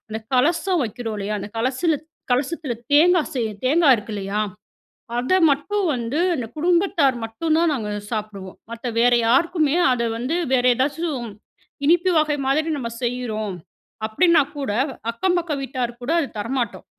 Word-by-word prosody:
அந்த 220 - -3 0.2
கலசம் 335 +5 +2
வைக்கிறோம், 225 0 -5
இல்லையா? 210 +1 -2
அந்த 205 - -6
கலசல 275 +7 +1 0.4
கலசத்துல 275 +1 -1 0.2
தேங்கா 340 +3 +6
செய்ய 235 -3 0 0.2
தேங்கா 300 +1 +4
இருக்கு 215 +1 -8
இல்லையா? 200 +1 -2 0.8
அத 255 +9 0 0.2
மட்டும் 380 +9 -1
வந்து, 240 +6 -2 0.2
அந்த 240 -5 -4
குடும்பத்தார் 335 -5 +2
மட்டும் 310 +9 -1
தான் 335 -2 +3
நாங்க 220 -6 -3 0.2
சாப்புடுவோம். 210 -4 -5
மத்த 230 +2 -6
வேற 245 +1 +5
யாருக்குமே, 310 +4 +2 0.2
அத 240 -1 0
வந்து 255 +8 -2 0.2
வேற 250 -1 +3
ஏதாச்சும் 275 -2 -2 0.6
இனிப்பு 350 +3 +4
வகை 300 -1 +1
மாதிரி 310 +4 +1
நம்ம 240 -4 -4
செய்றோம், 220 -5 -2 0.5
அப்டீன்னா 335 +7 +4 0.2
கூட 275 -7 -2 0.4
அக்கம் 355 +10 0
பக்க 335 -3 -2
வீட்டார்க்கு 245 -3 -4
கூட 305 - 0
அது 290 - -1
தரமாட்டோம். 235 +1 -3
265 Hz, 145 wpm, -22 LUFS, 230-325 Hz, 0.8 s, தேங்கா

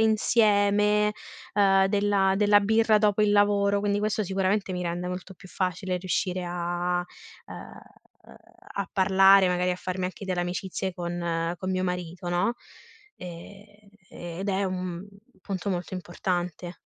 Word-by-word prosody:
insieme, 210 -1 +3 0.4
uhm, 195 -2 +4
della 200 -1 +2
della 205 0 +5
birra 220 +1 +3
dopo 210 -1 +2
il 210 -1 +3
lavoro, 205 0 +3
quindi 205 0 0
questo 215 0 -1
sicuramente 195 +1 0
mi 180 0 -3
rende 175 +1 -3
molto 180 +1 -7
più 185 +1 -15
facile 185 0 -2
riuscire 185 0 -2
a 175 0 -2 0.4
ehm, - - -10 0.9
a 200 -1 -3
parlare, 195 0 +5
magari 180 0 +1
a 180 - -1
farmi 185 0 -4
anche 190 +2 -8
delle 185 -2 -1
amicizie 180 +1 -3
con 170 -1 -2
con 185 - -3
mio 185 0 -1
marito, 180 -1 -4
no, 190 +7 +1 0.6
ehm, 180 +4 -10 0.4
e 175 -1 -8
ed 195 - -3
è 195 +1 0
un 185 0 -4 0.4
punto 195 0 -4
molto 180 0 -4
importante. 175 -1 -4
190 Hz, 140 wpm, -26 LUFS, 180-205 Hz, 0.9 s, della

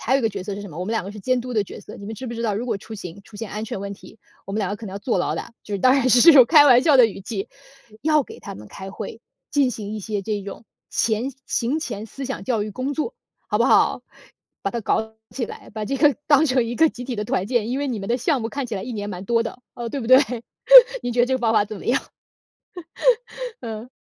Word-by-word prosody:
还 255 - +1
有 - - +5
一 - - -6
个 225 - +3
角 195 - -6
色 200 0 -4
是 205 - -7
什 200 - -9
么？ 155 - -9
我 180 - -2
们 215 - -3
两 225 - -1
个 195 - -6
是 210 - -10
监 255 +5 0
督 250 +1 -6
的 215 -3 +1
角 - - -10
色。 - - -11
你 200 - -10
们 220 - -5
知 255 +5 -7
不 - - -5
知 230 0 -4
道， 215 -3 0
如 220 +4 -3
果 225 -5 -2
出 220 +3 -10
行 185 -2 -8
出 215 - -14
现 210 -1 -6
安 210 +2 -4
全 205 - -5
问 200 0 -5
题， 210 +2 -14 0.3
我 195 - -6
们 210 - -1
两 195 -3 -1
个 205 - -3
可 220 - -9
能 190 - -7
要 200 - -5
坐 230 +4 -1
牢 - - 0
的。” - - -6
就 205 - -5
是 - - -1
当 255 - +6
然 265 -2 +2
是 250 +7 +8
用 260 -5 +8
开 300 0 +7
玩 250 -4 +7
笑 295 -2 +5
的 250 -3 +8
语 205 - -7
气。 195 0 -5 0.5
要 305 -1 +3
给 - - -12
他 - - -8
们 105 +1 -12
开 190 0 -8
会， 215 +2 -7 0.3
进 285 -3 +3
行 210 -3 -6
一 - - -4
些 205 0 -3
这 210 +1 -2
种 200 +3 -9 0.2
前 230 +4 0
行 260 +7 0
前 215 -8 -5
思 270 +5 -8
想 265 +1 -5
教 235 -5 0
育 210 - -4
工 255 +7 -3
作， 315 - -3 0.3
好 - - +1
不 - - +3
好？ - - +3 0.6
把 - - -1
它 235 - -3
搞 220 +1 -1 0.2
起 255 - -3
来， - - -10
把 215 0 -5
这 275 +6 -2
个 295 -1 +4
当 300 +1 +6
成 255 -3 +2
一 235 +1 -4
个 320 0 +5
集 250 - -8
体 250 -2 -4
的 210 - -2
团 190 -2 -1
建， 230 -2 0
因 260 +3 -1
为 285 - -1
你 240 -4 -2
们 195 - -6
的 240 - +2
项 260 +2 0
目 225 - -3
看 280 +3 -4
起 230 -4 -4
来 190 - -4
1 245 - -6
年 205 -2 -4
蛮 185 0 -6
多 230 +3 +2
的， 230 +2 -6 0.2
呃， 240 -1 -5
对 275 +4 -4
不 230 - -5
对？ 255 +2 +8 0.8
你 - - -2
觉 240 - +1
得 240 - +4
这 260 - 0
个 - - 0
方 230 -3 +1
法 215 -2 +4
怎 210 +1 -8
么 - - -10
样？ 250 - +2 1.6
嗯。 225 0 -7
230 Hz, 315 characters per minute, -22 LUFS, 205-255 Hz, 1.6 s, 是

